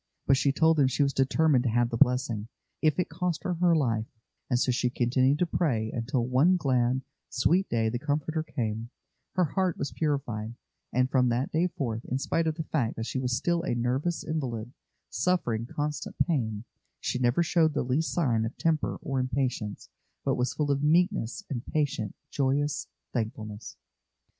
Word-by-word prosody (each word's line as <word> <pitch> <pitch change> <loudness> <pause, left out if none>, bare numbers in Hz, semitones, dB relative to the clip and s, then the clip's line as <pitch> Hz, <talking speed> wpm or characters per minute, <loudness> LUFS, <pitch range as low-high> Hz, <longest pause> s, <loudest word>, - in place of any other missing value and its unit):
But 135 - +5
she 140 +1 +2
told 160 +3 +3
them 140 -3 +5
she 140 +2 +1
was 140 -1 +1
determined 135 0 +3
to - - +3
have 120 +1 +2
the - - -1
blessing, 120 -3 +2 0.3
if 155 -2 +3
it 180 - +1
cost 170 0 -2
her 185 -3 0
her 175 0 +3
life, 115 -7 +1 0.4
and 125 - +3
so 125 +1 +2
she 125 0 +1
continued 130 +3 +2
to 180 - +2
pray, 120 -11 0
until 120 +1 -1
one 140 +9 +4
glad, 130 -4 +1 0.3
sweet 175 +10 +2
day 115 -1 +1
the 120 +2 -1
Comforter 150 +3 -1
came; 115 -7 -3 0.4
her 180 - +3
heart 180 +3 0
was 140 - -3
purified, 120 -8 -2 0.4
and 130 +1 +1
from 125 -2 +3
that 120 +3 0
day 165 +3 +2
forth, 120 -9 -3
in 130 - -1
spite 160 +4 0
of 160 - 0
the 160 - -3
fact 135 -7 -1
that 115 - -4
she 130 - -2
was 125 -1 0
still 170 +2 +1
a 165 -8 -1
nervous 130 +8 -1
invalid, 125 -7 -3 0.4
suffering 120 -11 0
constant 150 +2 -3
pain, 110 - -1 0.4
she 125 - -2
never 125 +7 +3
showed 160 -2 +2
the - - +1
least 130 +6 0
sign 120 -10 +1
of 110 +3 -4
temper 160 -2 0
or 135 -1 -1
impatience, 130 -5 -2 0.4
but - - +2
was 125 0 -1
full 145 -2 0
of 140 0 +1
meekness, 175 - +2
and 125 -5 -4
patient, 140 -9 -1 0.2
joyous 140 +1 0 0.3
thankfulness. 110 -3 -4
135 Hz, 180 wpm, -28 LUFS, 120-155 Hz, 0.4 s, But